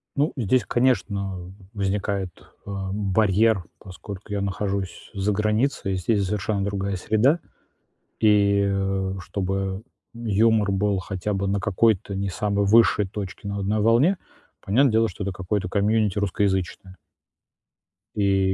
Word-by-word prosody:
Ну 145 Hz, +2 st, +1 dB
здесь, 125 Hz, +2 st, +2 dB
конечно, 100 Hz, -7 st, -1 dB, 0.2 s
возникает, 100 Hz, -1 st, -1 dB, 0.4 s
э, -, -, -6 dB, 0.2 s
барьер, 105 Hz, 0 st, +2 dB, 0.2 s
поскольку 100 Hz, +1 st, -10 dB
я 100 Hz, -, -1 dB
нахожусь 100 Hz, -1 st, -3 dB
за 100 Hz, +2 st, 0 dB
границей, 105 Hz, 0 st, 0 dB
здесь 100 Hz, +2 st, +1 dB
совершенно 100 Hz, +1 st, -1 dB
другая 100 Hz, 0 st, -2 dB
среда. 110 Hz, -, +2 dB, 0.8 s
И, 100 Hz, -2 st, +4 dB
э, 95 Hz, -1 st, -1 dB
чтобы 95 Hz, +2 st, -3 dB, 0.3 s
юмор 110 Hz, -2 st, +2 dB
был 100 Hz, 0 st, +1 dB
хотя 95 Hz, +2 st, -3 dB
бы 100 Hz, 0 st, -1 dB
на 100 Hz, +1 st, +1 dB
какой-то 100 Hz, 0 st, +1 dB
не 100 Hz, +1 st, -2 dB
самой 100 Hz, +1 st, 0 dB
высшей 105 Hz, -1 st, +5 dB
точке, 100 Hz, 0 st, -6 dB
но 100 Hz, -, -3 dB
на 100 Hz, -, -3 dB
одной 105 Hz, +2 st, 0 dB
волне, 120 Hz, -, +4 dB, 0.4 s
понятное 125 Hz, +6 st, +3 dB
дело, 115 Hz, 0 st, +3 dB
что 100 Hz, +1 st, -6 dB
это 100 Hz, -, -2 dB
какое-то 95 Hz, 0 st, -3 dB
комьюнити 105 Hz, 0 st, +1 dB
русскоязычное. 95 Hz, -2 st, -1 dB, 1.2 s
И, 95 Hz, -2 st, +2 dB
100 Hz, 130 wpm, -24 LUFS, 95-110 Hz, 1.2 s, высшей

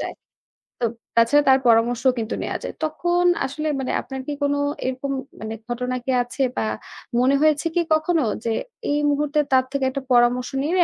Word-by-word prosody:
যায়। -, -, -4 dB, 0.7 s
তো 240 Hz, -, +1 dB, 0.3 s
তাছাড়া 235 Hz, +6 st, +5 dB
তার 265 Hz, -, +6 dB
পরামর্শও 235 Hz, +2 st, +4 dB
কিন্তু 225 Hz, 0 st, -3 dB
নেয়া -, -, -2 dB
যায়। -, -, -5 dB
তখন 345 Hz, +3 st, 0 dB, 0.2 s
আসলে 305 Hz, +4 st, -4 dB
মানে 260 Hz, -, -2 dB
আপনার 265 Hz, -1 st, -6 dB
কি 295 Hz, -, -2 dB
কোনো 285 Hz, 0 st, +1 dB, 0.3 s
এরকম 260 Hz, +2 st, -2 dB, 0.3 s
মানে 220 Hz, 0 st, -5 dB
ঘটনা 250 Hz, +1 st, -2 dB
কি 265 Hz, -, 0 dB
আছে? 245 Hz, +3 st, -3 dB
বা -, -, +1 dB, 0.5 s
মনে 260 Hz, +3 st, +4 dB
হয়েছে 310 Hz, 0 st, +3 dB
কি 350 Hz, -, +4 dB
কখনো 315 Hz, +1 st, +2 dB, 0.2 s
যে 230 Hz, -, +1 dB, 0.4 s
এই 290 Hz, -, +2 dB
মুহূর্তে 295 Hz, +1 st, +1 dB
তার 260 Hz, -1 st, +4 dB
থেকে 275 Hz, -1 st, 0 dB
একটা 275 Hz, +1 st, -4 dB
পরামর্শ 245 Hz, +1 st, +3 dB
নিলে, 350 Hz, +4 st, +3 dB
270 Hz, 175 wpm, -22 LUFS, 245-300 Hz, 0.7 s, তার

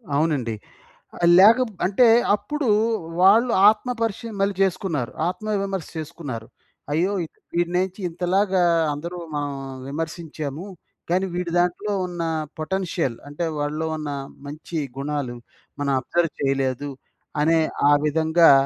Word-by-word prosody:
అవునండి. 145 Hz, -6 st, +1 dB, 0.6 s
ఆహ్, 170 Hz, -, +1 dB
లేక 215 Hz, +6 st, +8 dB
బ్ -, -, -17 dB
అంటే, 205 Hz, +6 st, +4 dB, 0.3 s
అప్పుడూ 295 Hz, +5 st, -2 dB, 0.5 s
వాళ్ళు 225 Hz, +6 st, +6 dB, 0.2 s
ఆత్మ 215 Hz, +3 st, -4 dB
పరీక్ష 225 Hz, -3 st, -1 dB, 0.2 s
మళ్ళీ 200 Hz, 0 st, +2 dB
చేసుకున్నారు. 180 Hz, -, -1 dB, 0.2 s
ఆత్మ 215 Hz, +4 st, -5 dB, 0.2 s
విమర్శ 195 Hz, -4 st, -3 dB
చేసుకున్నారు. 145 Hz, -8 st, -6 dB, 0.5 s
అయ్యో! 175 Hz, +6 st, +1 dB, 0.5 s
ఈడినేంచి 180 Hz, +3 st, -1 dB
ఇంతలాగా 185 Hz, +2 st, +1 dB, 0.3 s
అందరూ 170 Hz, +5 st, -6 dB, 0.2 s
మనం 145 Hz, -1 st, -2 dB, 0.4 s
విమర్శించాము, 160 Hz, 0 st, -5 dB, 0.5 s
కానీ 185 Hz, +2 st, +2 dB
వీడి 175 Hz, -1 st, -2 dB
దాంట్లో 180 Hz, +4 st, 0 dB
ఉన్న 175 Hz, -1 st, -5 dB, 0.4 s
పొటెన్షియల్ 170 Hz, -7 st, -1 dB
అంటే, 145 Hz, +4 st, -3 dB
వాడిలో 150 Hz, +2 st, -2 dB
ఉన్న 150 Hz, -2 st, -4 dB, 0.4 s
మంచి 155 Hz, +3 st, -6 dB, 0.2 s
గుణాలు 140 Hz, -3 st, -3 dB, 0.4 s
మనం 140 Hz, -1 st, +1 dB
అబ్జర్వ్ 165 Hz, +5 st, 0 dB
చెయలేదు 135 Hz, 0 st, 0 dB, 0.5 s
అనే 165 Hz, +2 st, +4 dB, 0.3 s
ఆ -, -, +6 dB
విధంగా 160 Hz, +2 st, +4 dB
170 Hz, 115 wpm, -23 LUFS, 145-190 Hz, 0.6 s, లేక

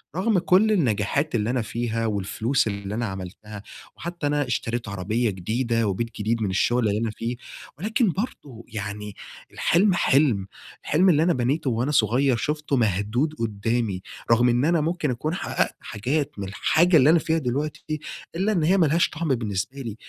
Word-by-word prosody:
رغم 190 Hz, +2 st, +2 dB
كل 185 Hz, +5 st, +4 dB
النجاحات 140 Hz, -, +1 dB
اللي 110 Hz, +1 st, 0 dB
أنا 125 Hz, -1 st, +1 dB
فيها 115 Hz, 0 st, -2 dB
والفلوس 110 Hz, +5 st, 0 dB
اللي 100 Hz, 0 st, -4 dB
أنا 120 Hz, +1 st, -1 dB
عملتها، 100 Hz, +2 st, -7 dB, 0.3 s
وحتى 170 Hz, -3 st, -4 dB
أنا 145 Hz, -2 st, 0 dB
اشتريت 120 Hz, -2 st, -2 dB
عربية 105 Hz, +4 st, -1 dB
جديدة 115 Hz, +4 st, -1 dB
وبيت 115 Hz, +4 st, -1 dB
جديد 110 Hz, +2 st, 0 dB
من 100 Hz, -, 0 dB
الشغل 115 Hz, +5 st, +2 dB
اللي 105 Hz, +1 st, 0 dB
أنا 115 Hz, -2 st, -1 dB
فيه، 120 Hz, +2 st, -3 dB, 0.4 s
ولكن 215 Hz, -, +1 dB
برضو 145 Hz, -, -6 dB
يعني 105 Hz, -1 st, -6 dB, 0.4 s
الحلم 185 Hz, +3 st, +3 dB
حلم، 135 Hz, -, +2 dB, 0.4 s
الحلم 180 Hz, +6 st, +3 dB
اللي 155 Hz, -2 st, +4 dB
أنا 175 Hz, -, +3 dB
بنيته 135 Hz, +3 st, 0 dB
وأنا 120 Hz, +5 st, 0 dB
صغير 125 Hz, +1 st, +3 dB
شفته 150 Hz, +4 st, -1 dB
مهدود 110 Hz, +6 st, +1 dB
قدامي، 110 Hz, -2 st, -1 dB, 0.3 s
رغم 120 Hz, +1 st, +5 dB
إن 120 Hz, +3 st, +2 dB
أنا 165 Hz, -1 st, +3 dB
ممكن 155 Hz, -3 st, -1 dB
أكون 150 Hz, +7 st, -2 dB
حققت -, -, -1 dB
حاجات 135 Hz, +8 st, -2 dB
من 100 Hz, -, -4 dB
الحاجة 160 Hz, -, +3 dB
اللي 140 Hz, +1 st, +5 dB
أنا 165 Hz, +1 st, +6 dB
فيها 160 Hz, +1 st, 0 dB
دلوقتي، 150 Hz, +3 st, -3 dB, 0.4 s
إلا 195 Hz, +5 st, +1 dB
إن 175 Hz, -7 st, +1 dB
هي 180 Hz, +5 st, +4 dB
ما 170 Hz, -, +5 dB
لهاش 165 Hz, +4 st, +2 dB
طعم 165 Hz, +2 st, -4 dB
بالنسبة 105 Hz, +3 st, -3 dB
لي 115 Hz, -5 st, -5 dB
120 Hz, 170 wpm, -24 LUFS, 110-155 Hz, 0.4 s, أنا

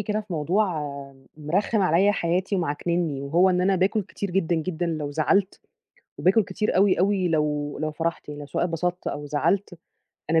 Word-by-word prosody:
كده 210 Hz, +1 st, -1 dB
في 210 Hz, -3 st, -9 dB
موضوع 170 Hz, +7 st, +1 dB, 0.7 s
مرخِّم 185 Hz, +8 st, 0 dB
عليّا 185 Hz, +3 st, +4 dB
حياتي 185 Hz, +2 st, 0 dB
ومعكننّي 170 Hz, -2 st, -1 dB
وهو 170 Hz, +7 st, +3 dB
إن 180 Hz, 0 st, +1 dB
أنا 190 Hz, +1 st, +2 dB
باكُل 195 Hz, +4 st, +1 dB
كتير 200 Hz, 0 st, -6 dB
جدًا، 180 Hz, -2 st, +1 dB
جدًا 175 Hz, +1 st, -2 dB
لو 155 Hz, -3 st, -3 dB
زعلت 180 Hz, +6 st, +1 dB, 0.6 s
وباكُل 195 Hz, +4 st, +4 dB
كتير 185 Hz, +3 st, -2 dB
أوي، 195 Hz, 0 st, +4 dB
أوي 195 Hz, -2 st, +2 dB
لو 150 Hz, -2 st, -1 dB
لو 155 Hz, +1 st, -2 dB
فرحت 165 Hz, 0 st, -3 dB
لو 145 Hz, 0 st, -7 dB
سواء 150 Hz, -, -1 dB
اتبسطت 175 Hz, +1 st, -2 dB
أو 145 Hz, 0 st, -4 dB
زعلت، 170 Hz, +5 st, 0 dB, 0.5 s
أنا 165 Hz, 0 st, +4 dB
175 Hz, 165 wpm, -25 LUFS, 155-195 Hz, 0.7 s, عليّا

